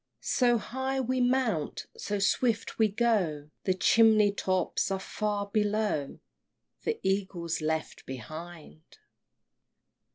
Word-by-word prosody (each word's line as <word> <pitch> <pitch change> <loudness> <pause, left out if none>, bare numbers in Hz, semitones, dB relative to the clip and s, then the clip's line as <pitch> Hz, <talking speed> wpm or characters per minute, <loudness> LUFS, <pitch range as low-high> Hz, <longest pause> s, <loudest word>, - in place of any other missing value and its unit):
So 240 -2 +3
high 265 +4 -3
we 255 0 0
mount, 245 - 0
so 205 - -3
swift 225 +4 0
we 220 - +5
go, 195 -10 0
The 185 - +2
chimney 215 +1 +5
tops 185 -2 0
are 195 - 0
far 205 +1 -2
below, 205 -7 0 0.6
The 455 0 -2
Eagle's 190 -4 -1
left 160 0 -3
behind! 155 - -9
205 Hz, 105 wpm, -29 LUFS, 170-230 Hz, 0.6 s, we